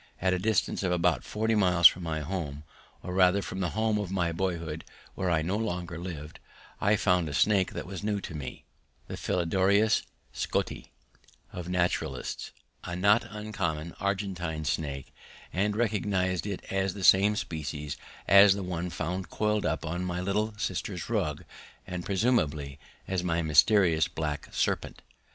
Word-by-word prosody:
At 95 0 +2
a 90 - 0
distance 110 +2 +1
of 95 -2 0
about 90 -1 +2
forty 110 +1 -1
miles 90 -5 +3
from 90 - +9
my 80 -2 -2
home, 75 -3 -4 0.4
or 90 - -5
rather 95 +1 +4
from 95 - -5
the 90 -2 0
home 110 -1 +2
of 100 -3 -3
my 90 -3 0
boyhood 85 -3 -3 0.3
where 95 - -2
I 80 -2 +2
no 90 +5 -1
longer 90 -6 -3
lived, 80 -4 -7 0.4
I 105 +2 +4
found 90 -5 +2
a 70 - -4
snake 100 0 +3
that - - -5
was 95 +1 -7
new 105 -1 0
to 90 - -7
me, 70 -4 -7 0.4
the - - -5
Philodryas 95 +5 +2 0.3
scotti - - -2 0.7
of 90 0 -6
naturalists, 90 -1 -1 0.3
a 85 - -4
not 100 +5 +3
uncommon 95 -7 -3
Argentine 95 -6 -2
snake, 70 -4 -3 0.4
and 105 +3 +1
recognized 100 -5 0
it 100 -2 -4
as 95 -1 0
the 100 - -6
same 100 +4 +6
species 75 -5 -4 0.3
as 100 0 +8
the 100 - -4
one 90 -1 -3
found 90 +3 -3
coiled 105 -1 0
up - - -2
on 85 +3 -2
my 90 -1 -2
little 105 +4 -1
sister's - - -3
rug - - -1 0.4
and 90 -1 -5
presumably 80 - 0 0.3
as 95 -2 -1
my 85 -1 0
mysterious 80 +1 +4
black 75 -2 -4
serpent. - - -1
90 Hz, 160 wpm, -29 LUFS, 85-100 Hz, 0.7 s, from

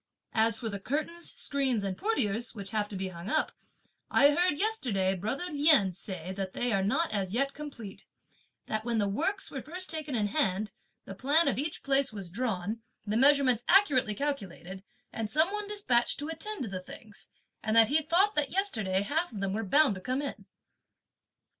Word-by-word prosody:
As 225 0 +3
for 230 - -4
the 200 -2 -4
curtains, 310 - -3
screens, 265 -6 0
and 195 -1 -2
portieres, 235 - +1
which 200 -2 -4
have 210 -1 -1
to 205 - -7
be 190 0 -3
hung 175 +2 -8
up, 310 - +1 0.6
I 285 +1 +5
heard 345 0 +2
yesterday 245 - +1
brother 220 - -3
Lien 290 - +4
say 185 -1 -6
that 190 -1 -5
they 245 -2 0
are 195 - +2
not 320 +12 +1
as 195 -1 -2
yet 275 +2 +1
complete, 250 -9 -9 0.6
that 215 0 -3
when 235 -1 -1
the 205 -2 +1
works 335 - 0
were 270 - -5
first 360 +6 -3
taken 310 -4 -4
in 215 -3 +1
hand, 205 -3 0 0.3
the 195 - -7
plan 285 - +2
of 270 - +1
each 300 +2 -3
place 275 -1 +2
was 195 -5 -7
drawn, 220 -1 -2 0.2
the 210 0 -2
measurements 265 -2 +4
accurately 285 - +4
calculated 195 - -4 0.3
and 220 -2 -3
some 315 - +2
one 420 -1 -3
despatched 330 -14 +2
to 295 +2 -5
attend 365 +3 -4
to - - -4
the 185 -1 -5
things, 205 +2 -11 0.3
and 220 +1 -1
that 225 -1 +7
he 310 +2 +3
thought 355 +7 +2
that 295 -6 +1
yesterday 215 - 0
half 320 +10 -1
of 210 - -7
them 195 -1 -2
were 220 - -1
bound 280 +4 +4
to 185 - -8
come 255 +8 -2
in. 280 - -6
240 Hz, 190 wpm, -29 LUFS, 200-300 Hz, 0.6 s, that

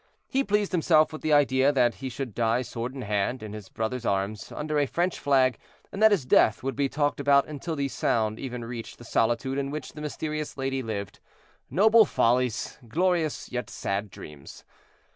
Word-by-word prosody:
He 270 +1 +1
pleased 210 -3 0
himself 160 -3 +3
with 155 - -7
the 155 - -1
idea 140 -1 +4
that 125 -4 +3
he 135 - -6
should 130 -2 -5
die 115 +3 +1
sword 120 +2 -5
in 130 - -5
hand, 105 +4 -1
in 105 -1 -7
his 105 -2 -9
brother's 115 +2 -3
arms, 100 0 -2
under 150 0 -2
a 145 - +2
French 175 +5 -1
flag, 130 -4 +2 0.3
and 200 - -6
that 220 - +8
his 195 -11 +1
death 110 -3 +4
would 135 0 -2
be 140 -1 0
talked 145 0 0
about 140 0 +4
until 155 +2 -5
the 140 -2 -1
sound 110 -4 0
even 125 -3 -5
reached 115 -1 -7
the - - -13
solitude 120 +4 0
in 140 0 -2
which 150 -1 -6
the 150 - -9
mysterious 150 0 -4
lady 135 0 -1
lived. 105 -4 -5 0.5
Noble 220 +3 +6
follies! 125 - 0
glorious, 170 +3 0
yet 125 0 -4
sad 100 +2 -3
dreams! 75 -5 -12
135 Hz, 190 wpm, -27 LUFS, 115-150 Hz, 0.5 s, that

